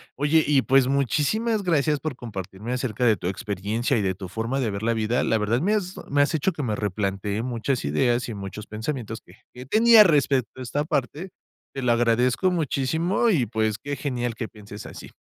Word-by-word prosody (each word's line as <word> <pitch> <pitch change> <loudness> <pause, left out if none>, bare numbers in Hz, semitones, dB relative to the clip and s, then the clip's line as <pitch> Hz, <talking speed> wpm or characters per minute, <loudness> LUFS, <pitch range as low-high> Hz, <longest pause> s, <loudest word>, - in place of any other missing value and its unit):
Oye, 150 +3 +3
y, 140 -3 +3
pues, 135 -1 +4
muchísimas 155 - +1
gracias 150 -5 +1
por 155 -3 -4
compartirme 105 0 -6
acerca 125 -2 -1
de 110 -2 +5
tu 90 - -5
experiencia 105 +4 -2
y 110 - +1
de 95 -2 -1
tu 95 -1 -7
forma 115 +8 -3
de 115 -5 0
ver 100 +1 -5
la 115 +1 0
vida. 110 +2 0
La 110 - +2
verdad, 110 +4 0
me 205 +6 +2
has 190 -3 -2 0.2
me 145 0 +4
has 150 - -1
hecho 160 +5 +1
que 150 -4 -5
me 110 -4 -1
replantee 100 +1 -2
muchas 125 - -2
ideas 120 - +1
y 115 - -5
muchos 100 +1 -7
pensamientos 115 0 -5
que - - -18 0.2
que 125 +1 -10
tenía 225 - +7
respecto 135 - +1
a - - -5
esta 145 +4 -2
parte. 150 +6 -2 0.5
Te 135 - -4
lo 120 - +3
agradezco 120 +8 +2
muchísimo 165 - 0
y, 145 - +2
pues, 110 -1 -1
qué 145 0 -5
genial 125 -4 -3
que 110 0 -5
pienses 105 -1 -11
así. - - -10
125 Hz, 205 wpm, -24 LUFS, 110-145 Hz, 0.5 s, tenía